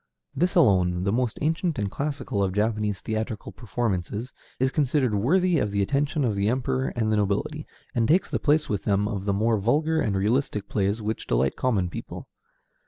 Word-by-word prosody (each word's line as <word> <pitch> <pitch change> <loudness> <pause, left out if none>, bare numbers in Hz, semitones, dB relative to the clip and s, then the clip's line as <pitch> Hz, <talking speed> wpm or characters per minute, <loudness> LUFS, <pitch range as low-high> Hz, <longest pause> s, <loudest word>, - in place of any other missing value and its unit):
This 180 +1 +1
alone, 90 - +3
the 100 - +1
most 120 0 0
ancient 165 0 0
and 100 -3 -2
classical 140 -7 -2
of 95 -2 0
Japanese 105 -1 0
theatrical 110 0 -4
performances, 110 0 -3 0.3
is 130 +1 +2
considered 135 -5 +1
worthy 170 - +2
of 105 - 0
the 100 0 0
attention 140 +5 0
of 110 -4 0
the 100 +1 +1
Emperor 130 +1 0
and 110 -2 0
the 110 - +2
nobility, 105 +10 -1 0.3
and 115 -3 +1
takes 175 +7 +3
the - - 0
place 150 0 +2
with 105 -2 -2
them 100 0 +1
of 100 -2 -4
the 100 - +1
more 110 +2 +2
vulgar 155 +9 +1
and 105 -7 0
realistic 105 0 0
plays 100 +2 -1
which 110 +1 -3
delight 65 +2 +1
common 105 -8 +1
people. - - -7
110 Hz, 185 wpm, -25 LUFS, 100-140 Hz, 0.3 s, alone